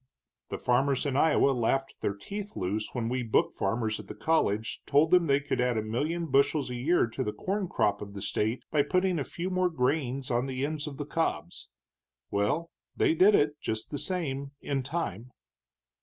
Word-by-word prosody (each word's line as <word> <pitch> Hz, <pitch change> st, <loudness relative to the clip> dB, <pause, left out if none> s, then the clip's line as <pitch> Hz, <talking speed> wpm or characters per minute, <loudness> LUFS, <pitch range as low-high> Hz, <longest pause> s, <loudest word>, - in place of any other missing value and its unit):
"The -, -, -3 dB
farmers 135 Hz, +3 st, +1 dB
in 140 Hz, -2 st, -1 dB
Iowa 145 Hz, -1 st, +4 dB
laughed 135 Hz, +2 st, -1 dB
their 100 Hz, -, -1 dB
teeth 205 Hz, -, -7 dB
loose 105 Hz, +4 st, -2 dB
when 120 Hz, -3 st, -2 dB
we 125 Hz, +2 st, -1 dB
book 115 Hz, -2 st, +1 dB
farmers 110 Hz, +2 st, -1 dB
at -, -, -10 dB
the -, -, -8 dB
college 110 Hz, -9 st, 0 dB
told 150 Hz, +3 st, +4 dB
them 180 Hz, -2 st, +5 dB
they 140 Hz, 0 st, +4 dB
could 145 Hz, -3 st, -1 dB
add 125 Hz, -2 st, +1 dB
a 110 Hz, -, 0 dB
million 150 Hz, +10 st, -1 dB
bushels 140 Hz, -1 st, +2 dB
a -, -, -3 dB
year 145 Hz, +8 st, +2 dB
to 115 Hz, -, -4 dB
the 105 Hz, -, -2 dB
corn 195 Hz, -, -2 dB
crop 105 Hz, -10 st, +1 dB
of 100 Hz, 0 st, -8 dB
the 100 Hz, -, -6 dB
state 110 Hz, +4 st, -1 dB
by 150 Hz, -, +4 dB
putting 180 Hz, +3 st, +1 dB
a -, -, 0 dB
few 175 Hz, +6 st, -5 dB
more 185 Hz, 0 st, +2 dB
grains 135 Hz, -3 st, -1 dB
on 120 Hz, +2 st, +1 dB
the 130 Hz, +1 st, -2 dB
ends 150 Hz, 0 st, -3 dB
of 140 Hz, -2 st, -7 dB
the 145 Hz, -, -4 dB
cobs. 90 Hz, -, -2 dB, 0.6 s
Well, 145 Hz, +12 st, 0 dB, 0.3 s
they -, -, +3 dB
did 195 Hz, +5 st, +6 dB
it, 150 Hz, 0 st, +2 dB
just 110 Hz, 0 st, -3 dB
the 145 Hz, -, -3 dB
same, 140 Hz, -6 st, -3 dB
in 140 Hz, -1 st, -2 dB
time." 125 Hz, -, -4 dB
135 Hz, 200 wpm, -29 LUFS, 115-160 Hz, 0.6 s, did